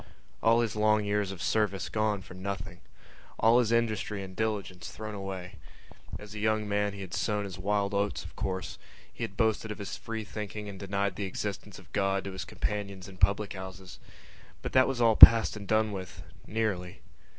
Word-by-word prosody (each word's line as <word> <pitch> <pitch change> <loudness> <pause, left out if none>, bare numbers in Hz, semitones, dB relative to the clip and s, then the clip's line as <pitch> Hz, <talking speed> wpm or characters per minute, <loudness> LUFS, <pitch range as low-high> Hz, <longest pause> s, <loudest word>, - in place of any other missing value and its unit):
All 115 +1 +4
his 115 -2 -2
long 105 0 +3
years 100 -1 0
of 95 -3 -7
service 105 -3 0
gone 105 -3 0
for - - -12
nothing! 95 -2 -6 0.6
All 115 +3 +5
his 115 -2 +1
industry 110 -3 0
and 95 -1 -9
diligence 100 -5 -3
thrown 110 0 -7
away! 95 -3 -6 0.6
As 105 0 -11
a 105 - -6
young 110 0 +1
man 105 0 0
he 100 - -8
had 90 -3 -8
sown 105 -2 0
his 95 -2 -8
wild 100 +1 0
oats, 100 -3 -1
of 85 - -11
course; 95 -2 -4 0.3
he - - -6
had 100 - -5
boasted 110 -1 +1
of 105 - -5
his 100 - -6
free 115 -1 -5
thinking 105 0 -6
and 100 -2 -8
denied 100 -1 -2
the 100 - -2
existence 100 +1 -5
of 95 - -17
God 95 -1 +1
to 100 - -5
his 95 - -6
companions 100 -3 -4
in 95 -1 -12
public 100 +2 +2
houses. 95 -2 -9 0.6
But - - -3
that 130 0 +5
was 130 -2 -2
all 115 -2 +5
passed 115 0 +10
and 100 -2 -8
done 110 +1 +2
with... 95 -2 -7 0.2
nearly. 105 -5 -2
100 Hz, 195 wpm, -29 LUFS, 95-110 Hz, 0.6 s, passed